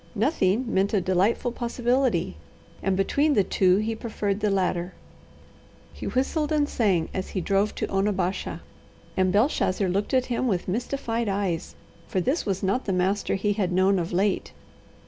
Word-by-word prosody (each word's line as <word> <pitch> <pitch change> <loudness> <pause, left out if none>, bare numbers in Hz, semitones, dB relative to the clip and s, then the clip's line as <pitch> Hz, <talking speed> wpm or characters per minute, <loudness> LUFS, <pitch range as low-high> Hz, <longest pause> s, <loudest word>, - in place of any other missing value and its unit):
Nothing 220 - +1
meant 200 -1 +1
a - - +4
delightful 190 +7 +1
possibility, 240 - 0 0.5
and 190 -1 0
between 285 +9 +2
the 200 - +4
two 185 0 +3
he 215 +2 -1
preferred 210 -3 -2
the 210 -1 +1
latter. 185 -2 -1 1.0
He - - -6
whistled 295 +4 0
and 295 -1 +2
sang 190 - +1
as 190 - -3
he - - -2
drove 195 +3 +1
to - - -1
Onabasha, 195 -1 -1 0.5
and 185 -1 +2
Belshazzar 205 -3 +2
looked 200 +7 0
at 255 -1 +3
him 250 +1 -1
with 185 -6 -1
mystified 235 +1 -2
eyes, 195 -4 -2 0.3
for 190 - -1
this 265 - 0
was 195 -1 -1
not 200 +7 0
the 195 - 0
master 190 +3 0
he 205 +2 0
had 195 -3 -1
known 190 +1 +3
of 170 0 -3
late. 190 +2 0
200 Hz, 165 wpm, -25 LUFS, 185-235 Hz, 1.0 s, a